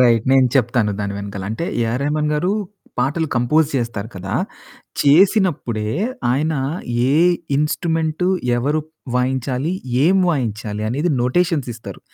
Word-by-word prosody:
Right. 115 Hz, -3 st, +4 dB
నేను 130 Hz, -1 st, +5 dB
చెప్తాను 115 Hz, -4 st, +2 dB
దాని 100 Hz, -1 st, -2 dB
వెనకాల 100 Hz, -1 st, -6 dB
అంటే 110 Hz, +10 st, -3 dB, 0.2 s
ఏఆర్ 115 Hz, +3 st, -1 dB
రెహమాన్ 150 Hz, +1 st, 0 dB
గారు 170 Hz, +5 st, 0 dB, 0.5 s
పాటలు 145 Hz, +6 st, +1 dB
కంపోజ్ 135 Hz, +6 st, +3 dB
చేస్తారు 115 Hz, -4 st, -3 dB
కదా! 95 Hz, +3 st, -5 dB, 0.7 s
చేసినప్పుడే 145 Hz, -, +3 dB, 0.4 s
ఆయన 150 Hz, +5 st, +1 dB, 0.6 s
ఏ -, -, +3 dB, 0.4 s
ఇన్‌స్ట్రుమెంటు 160 Hz, +2 st, 0 dB, 0.3 s
ఎవరు 145 Hz, +6 st, 0 dB, 0.3 s
వాయించాలి? 130 Hz, +4 st, 0 dB, 0.3 s
ఏం 185 Hz, +4 st, +4 dB
వాయించాలి? 110 Hz, -7 st, -2 dB
అనేది 150 Hz, +8 st, 0 dB
నొటేషన్స్ 155 Hz, +1 st, +1 dB
ఇస్తారు. 115 Hz, -, -10 dB
130 Hz, 120 wpm, -20 LUFS, 115-155 Hz, 0.7 s, నేను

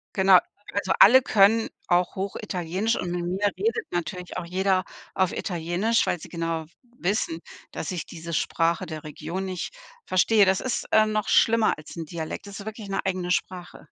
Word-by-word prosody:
Genau. 190 Hz, -1 st, +7 dB, 0.3 s
Also 195 Hz, -3 st, 0 dB
alle 255 Hz, +6 st, +9 dB
können 220 Hz, +1 st, +4 dB, 0.2 s
auch 180 Hz, 0 st, +2 dB
Hochitalienisch 190 Hz, +1 st, -2 dB
und 175 Hz, -, -3 dB
mit 175 Hz, 0 st, -2 dB
mir 195 Hz, +3 st, +1 dB
redet 455 Hz, +1 st, -1 dB
natürlich 180 Hz, +1 st, -4 dB
auch 180 Hz, -, -3 dB
jeder 185 Hz, +2 st, +1 dB, 0.3 s
auf 190 Hz, -1 st, +1 dB
Italienisch, 180 Hz, +5 st, 0 dB
weil 175 Hz, -, -1 dB
sie -, -, -10 dB
genau 165 Hz, -1 st, -3 dB, 0.3 s
wissen, 175 Hz, -3 st, -1 dB, 0.3 s
dass 160 Hz, -, -4 dB
ich 175 Hz, -4 st, -4 dB
diese 170 Hz, 0 st, -8 dB
Sprache 170 Hz, +3 st, 0 dB
der 155 Hz, -2 st, -7 dB
Region 170 Hz, +5 st, -5 dB
nicht 185 Hz, -, -5 dB, 0.3 s
verstehe. 205 Hz, +3 st, +4 dB
Das 190 Hz, 0 st, +2 dB
ist, 260 Hz, -, -2 dB
äh, 215 Hz, 0 st, +6 dB
noch 215 Hz, -1 st, -1 dB
schlimmer 230 Hz, -1 st, +4 dB
als 150 Hz, +2 st, -12 dB
'n 165 Hz, -, -4 dB
Dialekt. 160 Hz, +4 st, -6 dB
Das 200 Hz, 0 st, -8 dB
ist 200 Hz, -, -10 dB
wirklich 220 Hz, -2 st, -7 dB
'ne 195 Hz, -, -2 dB
eigene 185 Hz, -2 st, -2 dB
Sprache. 180 Hz, +1 st, -4 dB
185 Hz, 175 wpm, -25 LUFS, 170-205 Hz, 0.3 s, alle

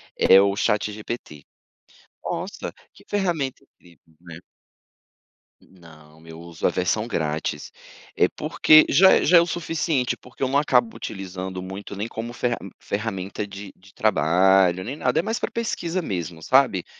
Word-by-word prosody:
é 95 Hz, -, +6 dB
o 100 Hz, 0 st, +2 dB
Chat 105 Hz, 0 st, 0 dB
GPT, 105 Hz, -8 st, -8 dB, 0.8 s
nossa -, -, -5 dB, 0.2 s
que -, -, -19 dB
ferramenta 170 Hz, -10 st, -2 dB
incrível, 85 Hz, -2 st, -24 dB
né. 85 Hz, -2 st, -11 dB, 1.2 s
Não, 80 Hz, -3 st, -18 dB
eu 80 Hz, 0 st, -10 dB
uso 85 Hz, -1 st, -3 dB
a -, -, +3 dB
versão 95 Hz, +5 st, -1 dB
grátis, 80 Hz, -7 st, -3 dB, 0.4 s
é -, -, +4 dB
porque 155 Hz, 0 st, +4 dB
já 190 Hz, +7 st, +6 dB
é -, -, +3 dB
já 175 Hz, +2 st, +6 dB
é -, -, +7 dB
o -, -, +1 dB
suficiente, 165 Hz, -6 st, -1 dB
porque 125 Hz, +1 st, -9 dB
eu 130 Hz, -, +1 dB
não 140 Hz, -, +2 dB
acabo 225 Hz, +9 st, +1 dB
utilizando 95 Hz, -1 st, -6 dB
muito, 95 Hz, +2 st, -8 dB
nem 105 Hz, +4 st, -4 dB
como 115 Hz, +2 st, -6 dB
ferra 120 Hz, -1 st, -1 dB, 0.2 s
ferramenta 100 Hz, -1 st, -4 dB
de 100 Hz, 0 st, -9 dB
de 95 Hz, 0 st, -21 dB
trabalho, 95 Hz, +2 st, +3 dB
nem 135 Hz, +7 st, -6 dB
nada, 155 Hz, -, 0 dB
é -, -, +4 dB
mais 225 Hz, +2 st, -2 dB
pra -, -, -2 dB
pesquisa 185 Hz, -6 st, -3 dB
mesmo, 85 Hz, -, -5 dB
sabe. 130 Hz, -, +3 dB
100 Hz, 155 wpm, -23 LUFS, 90-135 Hz, 1.2 s, é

